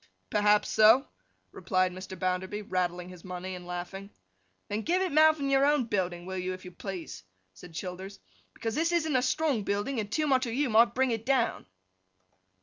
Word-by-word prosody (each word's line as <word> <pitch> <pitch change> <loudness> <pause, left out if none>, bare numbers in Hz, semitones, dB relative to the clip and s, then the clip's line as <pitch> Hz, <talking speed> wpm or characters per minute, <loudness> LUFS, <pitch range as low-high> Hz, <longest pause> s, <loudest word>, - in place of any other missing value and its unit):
'Perhaps 210 0 +3
so,' 220 +5 +6 0.4
replied 185 -3 0
Mr. 185 +1 -8
Bounderby, 185 +3 -2
rattling 180 -2 -2
his 180 -2 -12
money 185 0 -6
and 180 -1 -9
laughing. 180 +3 -6 0.6
'Then 210 +2 -2
give 345 +9 +1
it 375 -2 -1
mouth 310 +1 +5
in 280 - -1
your 275 0 +3
own 290 -1 +3
building, 180 -6 -2
will 190 0 -4
you, 185 +1 -2
if 185 0 -10
you 180 - -8
please?' 175 - -7 0.3
said 160 - -13
Childers. 190 +3 -6 0.4
'Because 225 -1 -3
this 330 +6 +1
isn't 320 -4 +1
a 255 - +4
strong 275 -2 +1
building, 205 +6 -2
and 205 -1 -4
too 310 +4 +1
much 260 -3 +2
of 230 - -3
you 275 -2 0
might 230 +2 +5
bring 260 0 +2
it 225 -1 -2
down! 265 - 0
205 Hz, 190 wpm, -29 LUFS, 185-265 Hz, 0.6 s, so